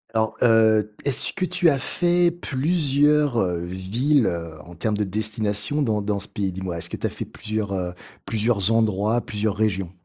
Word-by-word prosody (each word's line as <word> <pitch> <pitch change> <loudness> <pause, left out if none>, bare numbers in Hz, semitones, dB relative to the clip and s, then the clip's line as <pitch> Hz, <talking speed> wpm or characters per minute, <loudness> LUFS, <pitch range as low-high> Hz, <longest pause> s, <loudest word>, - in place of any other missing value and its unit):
Alors, 110 0 +1
heu, 110 -2 +4
est-ce 140 - 0
que 185 -1 -1
tu 180 -2 +2
as 140 - +2
fait 175 +5 +2
plusieurs, 150 -3 +1
heu, 90 -5 +1
villes, 110 +10 +1
heu, 85 -3 -3
en 85 - -12
termes 105 +5 -1
de 105 - +1
destinations 110 +7 -1
dans 105 -4 0
dans 100 0 -1
ce - - -3
pays? 100 -3 -3
Dis-moi, 90 -2 -5
est-ce - - -1
que - - -5
tu - - -4
as - - +1
fait - - -6
plusieurs, 110 -2 -4
heu, 90 -2 -3 0.3
plusieurs 110 -2 +1
endroits, 110 +1 +2
plusieurs 105 0 -2
régions? 100 -5 -1
110 Hz, 185 wpm, -23 LUFS, 100-135 Hz, 0.3 s, heu